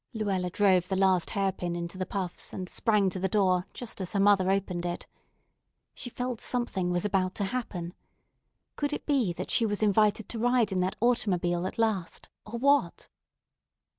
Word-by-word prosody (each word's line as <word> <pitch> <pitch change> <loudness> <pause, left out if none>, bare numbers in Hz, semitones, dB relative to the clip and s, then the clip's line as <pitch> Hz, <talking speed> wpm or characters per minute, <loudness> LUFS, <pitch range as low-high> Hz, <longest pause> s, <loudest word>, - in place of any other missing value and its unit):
Luella 195 -4 -1
drove 185 -2 +3
the 190 - -1
last 190 -2 +3
hairpin 190 -4 -1
into 170 +1 -5
the 185 -1 -3
puffs, 185 -3 -3
and 185 -1 -5
sprang 210 0 +2
to 185 - -5
the 190 +1 0
door 185 -2 +2
just 235 -5 -7
as 185 - -3
her 200 - +1
mother 195 -2 +4
opened 190 -3 0
it. 175 0 -4 0.9
She 245 - -6
felt 250 -1 -4
something 240 -8 -1
was 175 +2 0
about 190 -2 0
to 205 - -1
happen. 190 -6 -4 0.8
Could 290 0 -1
it - - -4
be 265 - +2
that 180 +2 -5
she - - +3
was 205 -2 0
to - - +4
be - - +4
invited 210 +1 +2
to 230 - -4
ride 240 -2 +2
in 190 - 0
that 185 +1 0
automobile 185 -7 +1
at - - -7
last, 215 -6 -1 0.2
or 235 +3 -5
what? 280 +4 +2
195 Hz, 190 wpm, -28 LUFS, 180-220 Hz, 0.9 s, mother